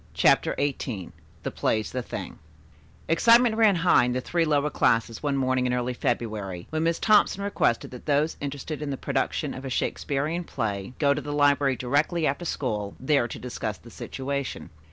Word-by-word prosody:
CHAPTER -, -, +3 dB
XVIII 125 Hz, -10 st, -2 dB, 0.3 s
THE -, -, -3 dB
PLAY'S 110 Hz, -1 st, -1 dB
THE 130 Hz, -, -2 dB
THING -, -, -7 dB, 0.7 s
Excitement 230 Hz, +7 st, +5 dB
ran 220 Hz, -3 st, +5 dB
high 170 Hz, -6 st, +4 dB
in 125 Hz, -, -1 dB
the 130 Hz, -, 0 dB
three 170 Hz, +6 st, 0 dB
lower 150 Hz, -1 st, +1 dB
classes 115 Hz, 0 st, +1 dB
one 145 Hz, -2 st, 0 dB
morning 130 Hz, -1 st, +1 dB
in 125 Hz, -, +1 dB
early 125 Hz, 0 st, -1 dB
February 105 Hz, -7 st, -3 dB
when 155 Hz, 0 st, -1 dB
Miss 165 Hz, 0 st, +1 dB
Thompson 205 Hz, -2 st, +3 dB
requested 200 Hz, -12 st, 0 dB
that 125 Hz, +3 st, -11 dB
those 150 Hz, +2 st, +2 dB
interested 145 Hz, +2 st, -5 dB
in 150 Hz, -, -3 dB
the 135 Hz, -, -3 dB
production -, -, -1 dB
of 130 Hz, -, -8 dB
a 135 Hz, -, -4 dB
Shakespearian 150 Hz, +6 st, -1 dB
play 105 Hz, -, -3 dB
go 140 Hz, -2 st, +3 dB
to 145 Hz, -, -3 dB
the 145 Hz, -, -6 dB
library 145 Hz, -2 st, +3 dB
directly 145 Hz, +7 st, 0 dB
after 145 Hz, +5 st, -1 dB
school, 105 Hz, -10 st, -3 dB
there 130 Hz, -2 st, +2 dB
to -, -, -7 dB
discuss 125 Hz, -1 st, -4 dB
the -, -, -15 dB
situation. 140 Hz, -1 st, -5 dB
140 Hz, 180 wpm, -26 LUFS, 125-155 Hz, 0.7 s, Excitement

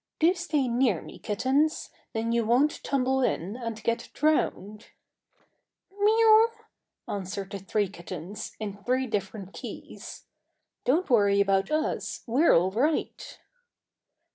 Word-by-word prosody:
"Do 330 Hz, +3 st, +4 dB
stay 300 Hz, -7 st, -1 dB
near 235 Hz, -6 st, +2 dB
me, -, -, -12 dB
kittens; 270 Hz, +9 st, 0 dB, 0.2 s
then 225 Hz, +1 st, -1 dB
you 235 Hz, 0 st, +2 dB
won't 250 Hz, +7 st, +2 dB
tumble 265 Hz, -1 st, +1 dB
in 200 Hz, -4 st, -1 dB
and 230 Hz, -3 st, -6 dB
get 230 Hz, 0 st, -1 dB
drowned." 215 Hz, -8 st, 0 dB, 1.1 s
"Miew!" 440 Hz, +2 st, +6 dB, 0.6 s
answered 195 Hz, 0 st, -5 dB
the 200 Hz, -, -5 dB
three 205 Hz, +2 st, 0 dB
kittens, 180 Hz, +1 st, -8 dB
in 205 Hz, -2 st, -6 dB
three 255 Hz, +1 st, +1 dB
different 200 Hz, -3 st, -4 dB
keys. -, -, -9 dB, 0.6 s
"Don't 320 Hz, +9 st, +2 dB
worry 200 Hz, -5 st, +4 dB
about 195 Hz, +1 st, +2 dB
us: 310 Hz, 0 st, -2 dB
we're 265 Hz, +8 st, +3 dB
all 180 Hz, +3 st, +4 dB
right!" 285 Hz, +10 st, -1 dB
230 Hz, 120 wpm, -27 LUFS, 200-280 Hz, 1.1 s, Miew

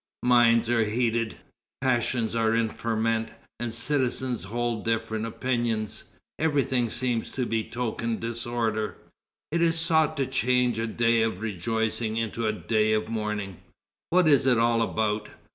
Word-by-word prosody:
Minds 120 Hz, -2 st, +5 dB
are 115 Hz, -1 st, +3 dB
heated, 115 Hz, 0 st, 0 dB, 0.4 s
passions 120 Hz, -3 st, 0 dB
are 115 Hz, -1 st, +2 dB
in 115 Hz, -1 st, +1 dB
ferment, 115 Hz, 0 st, -1 dB, 0.3 s
and 120 Hz, -1 st, -3 dB
citizens 125 Hz, -1 st, 0 dB
hold 120 Hz, +1 st, -2 dB
different 115 Hz, -1 st, -1 dB
opinions; 115 Hz, -3 st, -2 dB, 0.3 s
everything 135 Hz, -6 st, +1 dB
seems 120 Hz, -1 st, -1 dB
to 130 Hz, -, -2 dB
betoken 115 Hz, 0 st, -2 dB
disorder. 115 Hz, -2 st, -2 dB, 0.5 s
It 170 Hz, +2 st, +1 dB
is 165 Hz, -1 st, +3 dB
sought 160 Hz, -2 st, +2 dB
to 135 Hz, -, +1 dB
change 125 Hz, -1 st, +1 dB
a 115 Hz, -, -1 dB
day 115 Hz, 0 st, +2 dB
of 110 Hz, -4 st, 0 dB
rejoicing 110 Hz, +2 st, -2 dB
into 115 Hz, 0 st, -1 dB
a -, -, +2 dB
day 110 Hz, 0 st, +1 dB
of 110 Hz, 0 st, 0 dB
mourning.... 105 Hz, -4 st, -3 dB, 0.5 s
What 180 Hz, -1 st, +4 dB
is 140 Hz, -3 st, +4 dB
it 125 Hz, -3 st, +4 dB
all 115 Hz, 0 st, +3 dB
about? 110 Hz, -1 st, -1 dB
115 Hz, 140 wpm, -26 LUFS, 110-125 Hz, 0.5 s, Minds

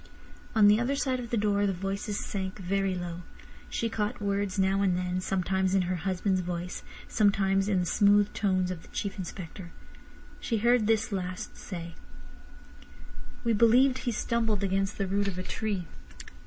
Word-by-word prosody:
On 215 Hz, -2 st, +7 dB
the 210 Hz, +1 st, +6 dB
other 250 Hz, +4 st, 0 dB
side 260 Hz, -2 st, 0 dB
of 240 Hz, -2 st, -6 dB
the 235 Hz, -, 0 dB
door 205 Hz, -1 st, +2 dB
the 195 Hz, -, +1 dB
voices 195 Hz, +3 st, -3 dB
sank 190 Hz, -2 st, -4 dB
very 195 Hz, 0 st, 0 dB
low. 175 Hz, -1 st, -5 dB, 0.5 s
She 230 Hz, -, -1 dB
caught 215 Hz, -2 st, -2 dB
words 200 Hz, -1 st, -1 dB
now 195 Hz, +1 st, +2 dB
and 185 Hz, -3 st, +2 dB
then, 180 Hz, 0 st, -1 dB
sometimes 190 Hz, 0 st, 0 dB
in 190 Hz, -, +3 dB
her 180 Hz, +1 st, -1 dB
husband's 185 Hz, +2 st, 0 dB
voice, 175 Hz, 0 st, -4 dB, 0.3 s
sometimes 195 Hz, -2 st, +2 dB
in 190 Hz, -3 st, +2 dB
the -, -, -1 dB
smooth 205 Hz, +2 st, +4 dB
tones 185 Hz, -3 st, +1 dB
of 175 Hz, -3 st, -5 dB
the -, -, -16 dB
Chief 200 Hz, 0 st, -4 dB
Inspector. 175 Hz, -1 st, -7 dB, 0.7 s
She 230 Hz, -, -1 dB
heard 235 Hz, 0 st, +3 dB
this 220 Hz, 0 st, +2 dB
last 185 Hz, -2 st, -4 dB
say: 170 Hz, -3 st, -7 dB, 1.5 s
"We 230 Hz, -1 st, +2 dB
believe 245 Hz, +4 st, +5 dB
he 245 Hz, -, -2 dB
stumbled 225 Hz, -2 st, 0 dB
against 195 Hz, +1 st, 0 dB
the 195 Hz, -, 0 dB
root 200 Hz, +1 st, 0 dB
of 190 Hz, -2 st, -3 dB
a 185 Hz, -, -3 dB
tree?" 200 Hz, -2 st, -2 dB
195 Hz, 170 wpm, -29 LUFS, 185-210 Hz, 1.5 s, On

